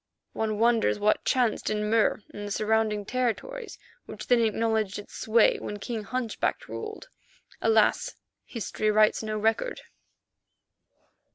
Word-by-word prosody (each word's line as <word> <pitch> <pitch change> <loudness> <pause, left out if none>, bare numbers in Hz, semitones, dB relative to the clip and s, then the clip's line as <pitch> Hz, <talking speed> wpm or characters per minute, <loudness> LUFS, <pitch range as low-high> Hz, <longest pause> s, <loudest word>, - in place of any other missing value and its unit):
One 215 -1 -1
wonders 230 0 +3
what 210 +1 +2
chanced 245 -4 +1
in 210 0 -1
Mur 220 -1 +2
and 205 0 -6
the - - -6
surrounding 215 -1 +1
territories 255 - -3 0.3
which - - -8
then 245 -1 +4
acknowledged 220 -2 0
its 205 - -10
sway 225 0 +3
when 205 - -5
King 220 0 -5
Hunchback 250 0 -2
ruled. 440 +3 -7 0.5
Alas! 445 - +2 0.3
history 215 -2 -2
writes 215 0 +4
no 215 -1 -3
record. 225 - 0
220 Hz, 125 wpm, -27 LUFS, 210-235 Hz, 0.5 s, then